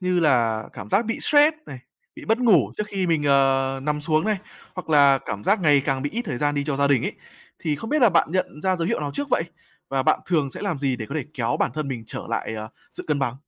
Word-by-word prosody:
như 180 -1 +1
là 115 -8 +2
cảm - - -9
giác 210 - +2
bị 225 +1 -3
stress 300 +1 +4
này, 130 - -8 0.4
bị - - -10
mất 225 +1 +1
ngủ 225 - +4
trước 210 - -1
khi 195 -3 -2
mình, 160 -3 +1
ờ, 135 -1 +2
nằm 150 +1 -1
xuống 155 +2 +1
này, 215 -2 0 0.4
hoặc 180 -3 -7
là 140 -2 +6
cảm 105 -1 -5
giác 205 0 +2
ngày 145 -5 +4
càng 135 -1 -1
bị 145 - -2
ít 235 +3 -3
thời 145 - -4
gian 145 +3 0
đi 145 -1 -1
cho 140 -2 -2
gia 140 0 +2
đình 140 -4 +3
ấy, - - -2 0.5
thì 150 -2 -2
không 225 +10 -7
biết 305 -2 +2
là 240 - +8
bạn 170 -2 +3
nhận 180 -4 -2
ra 185 -1 +1
dấu 170 -1 -2
hiệu - - -1
nào 145 -1 -3
trước 285 0 -3
vậy? - - +2 0.5
Và 135 -1 0
bạn - - +2
thường 155 -6 +1
sẽ - - -8
làm 190 -8 -2
gì 135 -2 0
để 110 -3 -6
có 140 - -6
thể 155 -4 -2
kéo 120 -3 -1
bản - - +2
thân 155 -2 -3
mình 125 -4 -4
trở - - -6
lại, 110 - -3
ờ, 110 0 -6 0.2
sự - - -8
cân 150 -2 +1
bằng? 135 -4 -1
150 Hz, 280 wpm, -23 LUFS, 135-185 Hz, 0.5 s, là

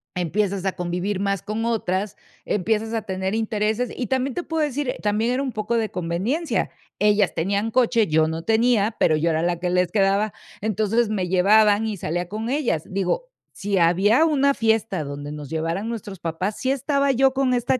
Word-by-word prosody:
Empiezas 190 +2 -1
a 190 - 0
convivir 180 +3 -2
más 200 -1 -1
con 215 +2 -3
otras, 205 -3 -1 0.3
empiezas 220 +3 0
a 225 - 0
tener 190 -1 -3
intereses, 220 +2 0
y 245 - -3
también 265 +1 -1
te 355 - -2
puedo 325 -1 -2
decir, 290 -2 -2
eh, - - -3
también 210 +3 +1
era 260 - 0
un 275 -2 -2
poco 215 +2 -2
de 220 -2 0
conveniencia, 185 - -1 0.3
ellas 205 -2 +3
tenían 200 +6 -1
coche, 235 -2 +3
yo 155 0 +3
no 160 +1 -4
tenía, 225 +1 +2
pero 160 - +4
yo 165 +2 +1
era 160 0 0
la 175 0 0
que 175 0 -1
les 180 0 +1
quedaba, 200 +1 +2 0.3
entonces 220 +2 +1
me 195 -4 -1
llevaban 205 +3 +4
y 215 -2 -3
salía 175 +1 -3
con 220 +3 -4
ellas. 255 - 0
Digo, 195 - -2 0.2
si 200 0 -2
había 190 - +4
una 280 -3 +3
fiesta 220 - 0
donde 145 +1 -6
nos 150 -2 -7
llevaran 165 +7 -2
nuestros 205 -5 -6
papás, 175 +5 -3
sí 260 - -1
estaba 280 +1 +1
yo 265 +1 +3
con 265 -1 +1
esta 245 +1 0
210 Hz, 190 wpm, -23 LUFS, 180-235 Hz, 0.3 s, pero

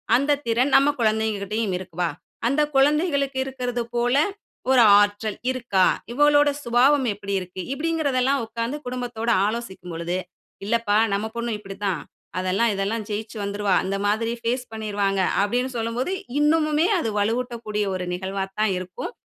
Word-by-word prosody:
அந்த 280 +3 +2
திறன் 250 +4 +2
நம்ம 275 +2 +6
கொழந்தைகிட்டயும் 215 -2 0
இருக்குப்பா. 175 -2 -3 0.4
அந்த 280 +4 +2
குழந்தைகளுக்கு 280 -1 +2
இருக்றது 250 -2 -3
போல, 240 +2 +2 0.6
ஒரு 255 - +6 0.2
ஆற்றல் 205 +1 -1
இருக்கா? 230 -7 +2 0.3
இவளோட 290 +2 +5
சுபாவம் 255 +3 +3
எப்டி 200 0 -5
இருக்கு? 185 0 -7
இப்டிங்கறதெல்லாம் 280 -4 +1
உட்கார்ந்து 230 +5 -3
குடும்பத்தோட 245 -2 -3 0.2
ஆலோசிக்கும் 210 -6 -5
பொழுது, 170 +2 -2 0.5
'இல்லப்பா 215 -1 +1 0.2
நம்ம 200 +2 0
பொண்ணு 235 0 -2
இப்டி 195 -1 -9
தான். 185 -5 0 0.4
அதெல்லாம் 195 +5 +1
இதெல்லாம் 205 +3 -2
ஜெயிச்சு 215 +1 -4
வந்துருவா. 200 -1 0
இந்த 195 0 -1
மாதிரி 220 +2 0
ஃபேஸ் 245 +2 -1
பண்ணிருவாங்க.' 205 -3 -1 0.2
அப்டின்னு 245 +5 0
சொல்லும்போது 230 +9 -2 0.3
இன்னமுமே 305 +2 +3
அது 225 - -1
வலுவூட்டக்கூடிய 225 -1 -1
ஒரு 180 -1 -3
நிகழ்வா 190 +2 -3 0.2
தான் 215 -3 +2
இருக்கும். 185 - -6
230 Hz, 135 wpm, -23 LUFS, 200-260 Hz, 0.6 s, நம்ம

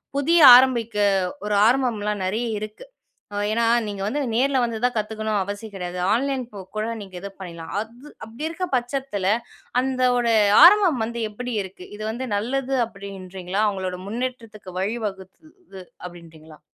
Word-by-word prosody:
புதிய 325 +5 +3 0.2
ஆரம்பிக்க 240 -3 +3 0.5
ஒரு 210 - -1
ஆரம்பம்லாம் 220 -5 0
நெறைய 220 +6 -1
இருக்கு. 215 - -8 0.5
அ - - -5 0.2
ஏன்னா 230 +1 +1 0.2
நீங்க 200 -1 -5
வந்து 290 +7 -1
நேர்ல 265 +1 +2
வந்து 230 -1 -4
தான் 250 - 0
கத்துக்கணும்னு 215 0 -2
அவசியம் 205 +2 -7
கெடையாது. 180 -1 -5
ஆன்லைன் 265 +2 0
போ 200 - -8 0.2
கூட 215 +1 -1 0.2
நீங்க 190 -2 -11
இது 200 - -6
பண்ணிடலாம். 170 -3 -8
அது 235 +6 -11 0.2
அப்படி 230 +7 -7
இருக்க 365 +3 -4
பட்சத்தில 245 -5 -2 0.5
அந்த 260 0 -2 0.2
ஒரு 235 -1 +2 0.3
ஆரம்பம் 355 - +6
வந்து 235 +1 -5
எப்படி 245 +3 -5
இருக்கு? 185 -1 -11
இது 215 - -7
வந்து 255 +3 -5
நல்லது 265 +5 -2
அப்படின்றீங்களா? 195 -2 -6
அவங்களோட 185 -2 -4
முன்னேற்றத்துக்கு 230 -4 -6
வழிவகுத்தது 210 - -6 0.2
அப்படின்றீங்களா? 160 -3 -13
220 Hz, 145 wpm, -23 LUFS, 195-255 Hz, 0.5 s, ஆரம்பம்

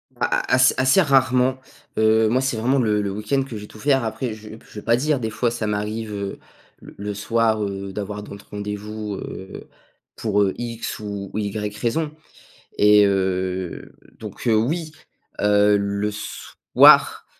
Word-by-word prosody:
A - - 0
a - - -1
as 130 0 +5
assez 130 +9 +4
rarement, 130 -3 +3 0.4
heu, 110 0 +4
moi 130 +3 +2
c'est 135 -3 -1
vraiment 130 +5 +1
le 105 -3 +1
le 100 - -2
week-end 105 +7 -1
que 135 - -13
je - - -8
vais 105 - -9
tout - - -15
faire. 135 -2 +2
Après 110 +2 -3
je 110 0 -11 0.2
je 105 - -9
veux - - -14
pas 115 +1 +4
dire, 145 +2 0
des 110 -2 -2
fois 115 +1 -1
ça 115 -2 -3
m'arrive, 105 +1 -3
heu, 100 -1 -5 0.4
l - - -13
le 105 +1 -4
soir, 110 +1 +1
heu, 100 -1 -4
d'avoir 105 +1 -5
d'autres 100 -1 -11
rendez-vous, 105 0 -5
heu, 95 0 -8 0.5
pour, 105 -2 0
heu, 95 - 0
X 120 -2 -5
ou 100 -2 -6
Y 105 0 -3
raison 150 +6 -1 0.7
et 105 0 +6
heu 95 -2 -2 0.3
donc - - -7
heu, 110 - +4
oui, 155 +8 -1 0.5
heu, 105 0 +4
le 100 +1 -1
soir, 105 - +3
105 Hz, 175 wpm, -22 LUFS, 105-120 Hz, 0.7 s, et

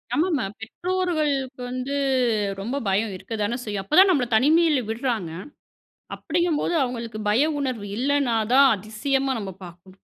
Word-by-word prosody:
ஆமா, 325 +4 +2
ஆமா. 265 - 0 0.2
பெற்றோர்களுக்கு 300 -2 -2
வந்து 255 +3 -3 0.6
ரொம்ப 235 +7 -3
பயம் 200 +2 0
இருக்க 205 +5 -9
தானே 230 +4 -1
செய்யும். 205 -2 -3
அப்ப 300 - -1
தான் 385 0 +7
நமபள 260 -7 +1
தனிமையில 300 +1 +4
விடுறாங்க 225 -7 -2 0.8
அப்படிங்கும்போது, 340 0 -1
அவுங்களுக்கு 235 -4 -3
பய 240 +8 +3
உணர்வு 250 -7 -3
இல்லைனா 275 -2 +1 0.2
தான், 275 +1 +7
அதிசயமா 265 +7 -1
நம்ம 195 -2 -5
பார்க்கணும். 175 +2 -15
255 Hz, 135 wpm, -24 LUFS, 215-285 Hz, 0.8 s, தான்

